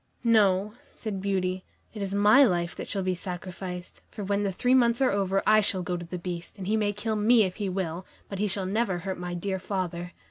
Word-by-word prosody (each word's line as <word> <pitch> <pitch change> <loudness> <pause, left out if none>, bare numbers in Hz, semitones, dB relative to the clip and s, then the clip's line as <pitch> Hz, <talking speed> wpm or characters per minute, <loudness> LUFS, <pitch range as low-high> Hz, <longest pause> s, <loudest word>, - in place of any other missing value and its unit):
"No," 210 -3 +3 0.2
said 205 -4 -4
Beauty, 185 -1 -1 0.3
"it 215 - -7
is 195 0 -2
my 210 +7 +6
life 175 -7 +1
that - - -6
shall 195 -2 -1
be 185 0 0
sacrificed, 180 0 -7
for 210 - -7
when 200 +1 0
the 200 -1 0
three 245 +7 +1
months 235 -2 +4
are 265 -2 +3
over, 195 -1 0
I 215 0 +6
shall 190 -3 +2
go 180 - -2
to 175 -1 -6
the 180 - -5
Beast, 170 -1 -6
and 190 - -6
he 210 +3 +1
may 210 -2 +1
kill 215 +2 -2
me 220 +2 +5
if 185 -2 -3
he 205 -2 -2
will, 180 -1 -3 0.2
but 195 - -6
he 210 - +1
shall 190 0 0
never 195 -1 0
hurt 185 +1 -5
my 175 0 -4
dear 190 +2 -2
father." 180 -2 -4
195 Hz, 235 wpm, -27 LUFS, 180-210 Hz, 0.3 s, my